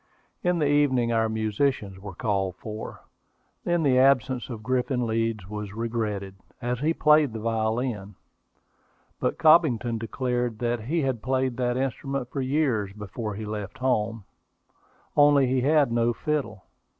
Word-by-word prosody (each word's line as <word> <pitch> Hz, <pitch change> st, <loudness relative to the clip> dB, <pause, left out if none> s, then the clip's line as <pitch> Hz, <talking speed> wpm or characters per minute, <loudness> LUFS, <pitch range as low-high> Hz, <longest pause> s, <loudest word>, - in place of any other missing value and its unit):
In 180 Hz, 0 st, +2 dB
the 155 Hz, -, +1 dB
evening 135 Hz, -5 st, +2 dB
our 110 Hz, -1 st, +2 dB
musicians 110 Hz, -2 st, -1 dB
were 100 Hz, -2 st, -9 dB
called 95 Hz, -3 st, -1 dB
for. 110 Hz, +3 st, -7 dB, 0.6 s
Then 175 Hz, -1 st, +1 dB
the 130 Hz, -3 st, +4 dB
absence 130 Hz, -2 st, +3 dB
of 115 Hz, -3 st, -7 dB
Griffin 125 Hz, 0 st, 0 dB
Leeds 115 Hz, -3 st, -1 dB
was 105 Hz, -1 st, -6 dB
regretted, 110 Hz, -4 st, -3 dB, 0.3 s
as 125 Hz, 0 st, -2 dB
he 150 Hz, +4 st, +1 dB
played 150 Hz, -5 st, +4 dB
the 110 Hz, -, -4 dB
violin; 110 Hz, -2 st, -2 dB, 1.0 s
but -, -, -1 dB
Cobbington 130 Hz, -8 st, +4 dB
declared 120 Hz, 0 st, -2 dB
that 120 Hz, -1 st, -2 dB
he 165 Hz, +6 st, 0 dB
had 130 Hz, -4 st, -1 dB
played 130 Hz, 0 st, 0 dB
that 125 Hz, -1 st, 0 dB
instrument 135 Hz, -1 st, -3 dB
for 140 Hz, -, -2 dB
years 130 Hz, -7 st, 0 dB
before 105 Hz, +1 st, -5 dB
he 110 Hz, +1 st, -5 dB
left 105 Hz, +2 st, -5 dB
home: 115 Hz, -4 st, 0 dB, 0.9 s
only 145 Hz, -2 st, +6 dB
he 130 Hz, 0 st, +1 dB
had 145 Hz, -1 st, +3 dB
no 120 Hz, 0 st, +2 dB
fiddle. 140 Hz, -8 st, -3 dB
120 Hz, 145 wpm, -26 LUFS, 110-135 Hz, 1.0 s, only